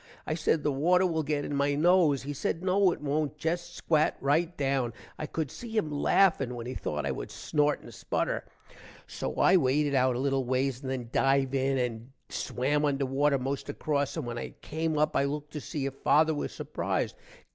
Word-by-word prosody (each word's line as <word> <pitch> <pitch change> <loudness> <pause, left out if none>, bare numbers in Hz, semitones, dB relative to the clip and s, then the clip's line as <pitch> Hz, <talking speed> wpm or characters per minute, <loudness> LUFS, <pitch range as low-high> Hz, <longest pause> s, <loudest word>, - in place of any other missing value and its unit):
i - - -1
said 155 -1 +1
the 150 - +2
water 175 +7 +3
will 165 -3 +1
get 145 -1 -1
in - - -4
my 140 0 +1
nose. 160 -3 +4
he 145 +2 -4
said 165 +4 -2
no 190 0 +4
it - - -5
wont 150 +1 -1
jest 175 +3 -2
squat 155 -3 +1
rite 160 +5 +1
down. 135 -4 0 0.3
i 155 - -3
cood 155 -2 -3
see 225 -2 -6
him 155 -8 0
laffin 145 -4 +3
when 120 -1 -6
he 125 - -4
thought - - -3
i - - 0
wood - - -5
snort 150 0 0
and - - -12
sputter. - - -2 0.6
so - - -5
i - - +5
waded 145 -2 +2
out 130 -2 +3
a - - -2
little 135 0 +1
ways 130 +1 0
and 135 - -5
then 130 -2 -2
div 135 0 +2
in 135 0 +1
and 120 0 -3 0.2
swam 145 +4 -1
under 140 -2 +1
water 140 +2 +2
most 135 +2 -3
across, 145 -1 -1
and - - -3
when 120 0 -4
i - - -5
came 160 0 -2
up 150 +1 +1
i 140 - +3
looked 150 +1 -4
to 150 - -4
see 145 -2 -4
if 135 - -2
father 155 +3 +3
was 145 - -3
surprised. - - -2
145 Hz, 210 wpm, -29 LUFS, 135-155 Hz, 0.6 s, i